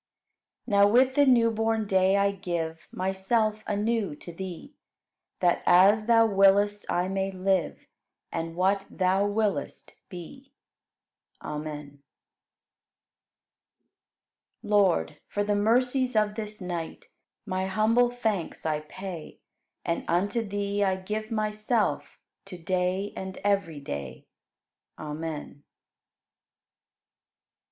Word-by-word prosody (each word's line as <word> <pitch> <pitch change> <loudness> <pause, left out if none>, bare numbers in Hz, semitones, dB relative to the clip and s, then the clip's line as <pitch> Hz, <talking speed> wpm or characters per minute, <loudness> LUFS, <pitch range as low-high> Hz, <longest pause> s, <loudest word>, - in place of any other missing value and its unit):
15. 250 - -7
Now 200 - +8
with 255 +5 +4
the 285 +1 +4
new 235 -3 +5
born 225 0 0
day 190 0 +3
I 200 0 +3
give 170 -4 -4
Myself 210 +4 0
anew 210 -4 -1
to 170 +3 -10
Thee, 190 - -8 0.7
That 175 -1 +3
as 205 +4 +5
Thou 230 -1 +6
willest, 205 0 +3
I 175 +1 +1
may 195 0 -1
live, 185 -3 -1 0.5
And 165 0 -4
what 195 +2 +1
Thou 190 +2 +1
willest, 205 0 -2 0.2
be. 195 - -11 0.9
Amen. 150 -2 -6 2.6
16. 210 - -7
Lord, 190 - +2
for 205 - -1
the 205 0 0
mercies 250 +4 +2
of 210 -1 +2
this 210 -1 -6
night 175 -3 -6 0.4
My 190 -2 -2
humble 220 +5 +3
thanks 220 -10 -3
I 155 -1 0
pay 170 +1 -8 0.5
And 170 -1 -1
unto 200 +7 +1
Thee 205 -1 -2
I 190 -1 +2
give 210 +3 -4
myself 215 0 -1 0.3
To 190 -2 -8
day 185 +3 -1
and 190 0 -6
every 195 -7 0
day. 70 - -7 0.7
Amen. 155 +1 -4
17. 145 0 -12
195 Hz, 115 wpm, -27 LUFS, 180-215 Hz, 2.6 s, Now